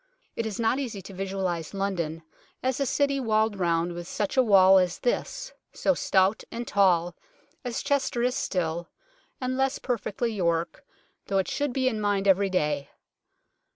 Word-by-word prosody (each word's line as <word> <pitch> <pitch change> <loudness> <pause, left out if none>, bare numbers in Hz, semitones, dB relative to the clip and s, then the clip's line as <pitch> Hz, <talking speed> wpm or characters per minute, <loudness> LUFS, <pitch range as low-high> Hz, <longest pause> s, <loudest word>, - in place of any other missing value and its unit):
It 230 - -2
is 210 -1 -5
not 230 +4 +2
easy 235 -7 -4
to 195 - -10
visualize 190 -3 -3
London 170 -5 -2 0.4
as 260 0 0
a 275 - +1
city 280 +1 +1
walled 220 -4 +1
round 170 -1 +1
with 175 0 -7
such 205 +5 -2
a 260 - +6
wall 195 -4 +7
as 180 -1 0
this, - - -2 0.2
so 285 - +2
stout 195 -4 +2
and 235 +1 -5
tall, 175 -3 +3 0.5
as 245 -3 -3
Chester 265 -4 0
is 250 0 +2
still, 170 -6 -2 0.5
and 255 0 -2
less 270 +1 +1
perfectly 235 -1 -2
York, 170 -4 -1 0.4
though 195 - 0
it 190 - +1
should 290 -2 -1
be 260 +1 0
in 220 -4 0
mind 200 -1 +1
every 195 +1 +4
day. 150 -6 0
200 Hz, 165 wpm, -27 LUFS, 180-245 Hz, 0.5 s, wall